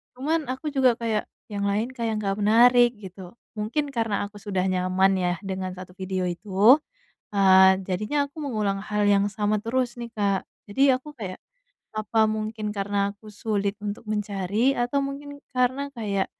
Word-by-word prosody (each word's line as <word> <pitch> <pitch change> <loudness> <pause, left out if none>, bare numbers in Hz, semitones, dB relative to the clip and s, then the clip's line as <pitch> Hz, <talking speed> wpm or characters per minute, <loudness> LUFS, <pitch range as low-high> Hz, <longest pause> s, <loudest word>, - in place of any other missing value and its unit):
cuman 305 +4 -1
aku 260 +4 -5
juga 255 -3 +4
kayak, 225 -2 0 0.3
"Yang 200 -1 -2
lain 215 +3 0
kayak 230 -3 -1
gak 195 0 0
menarik," 240 +3 +6
gitu. 190 -1 -10 0.2
Mungkin 230 +8 -1
karena 225 -6 -1
aku 205 - -22
sudah 195 -3 -2
nyaman 185 +1 +2
ya 180 -1 +1
dengan 190 -1 -3
satu 185 0 -10
video 185 0 -2
itu, 200 - +4 0.6
eee, 190 -1 +6
jadinya 215 +10 0
aku 300 - -15
mengulang 215 -8 -1
hal 210 0 0
yang 200 0 +4
sama 210 0 0
terus 245 +1 -1
nih, 235 -1 -6
Kak. 200 -2 +1 0.3
Jadi 270 +6 +4
aku 295 +4 -7
kayak, 190 -4 -6 0.6
"Apa 220 +1 +2
mungkin 215 0 -3
karena 200 0 0
aku 215 +1 -15
sulit 205 -1 -2
untuk 205 +1 -4
mencari 210 +4 0
atau 245 +3 +1
mungkin 285 +1 -7 0.2
karena 255 +2 +1
kayak, 200 -5 -1
210 Hz, 160 wpm, -25 LUFS, 195-240 Hz, 0.6 s, menarik